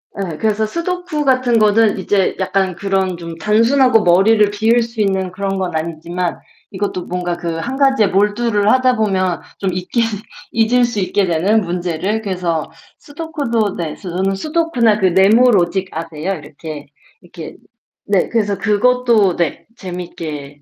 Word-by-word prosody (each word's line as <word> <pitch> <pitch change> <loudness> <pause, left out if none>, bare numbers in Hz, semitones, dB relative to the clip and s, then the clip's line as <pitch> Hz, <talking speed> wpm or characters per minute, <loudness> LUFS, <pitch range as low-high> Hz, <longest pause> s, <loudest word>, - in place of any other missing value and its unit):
에. 185 -6 -4
그래서 220 +2 0
스도쿠 335 +3 -3
같은 255 -3 +3
거는 215 0 +3
이제 190 0 +1
약간 190 -1 0
그런 190 -1 -1
좀 170 -1 -8
단순하고 230 - +3
머리를 205 +4 +4
비울 225 +3 +2
수 230 -1 -4
있는 190 -2 0
그런 195 +1 -3
건 185 -3 -3
아니지만 170 +2 -3 0.3
이것도 190 -2 -3
뭔가 175 -1 -3
그 170 -2 -4
1 245 +11 -4
가지에 270 -6 +3
몰두를 210 +2 +1
하다 255 -1 +3
보면 185 -5 0 0.2
좀 195 -2 -1
잊게 185 +6 -1 0.5
잊을 230 +2 +2
수 235 -3 -3
있게 190 +1 +1
되는 185 +7 +2
문제를 180 +3 -2
그래서 180 -6 -2 0.3
스도쿠도 285 - -3
네. 165 -3 -4
저는 190 +1 -2
스도쿠나 250 - +1
그 190 - +3
네모 205 +7 +5
로직 190 0 +1
아세요? 165 +3 -4
이렇게 150 -2 -9 0.3
이렇게 170 -2 -10 0.5
네. 195 -3 +1
그래서 205 -3 0
그것도 220 -1 +2
네. 170 -3 -2
재밌게 160 -7 -7
195 Hz, 305 characters per minute, -17 LUFS, 175-225 Hz, 0.5 s, 네모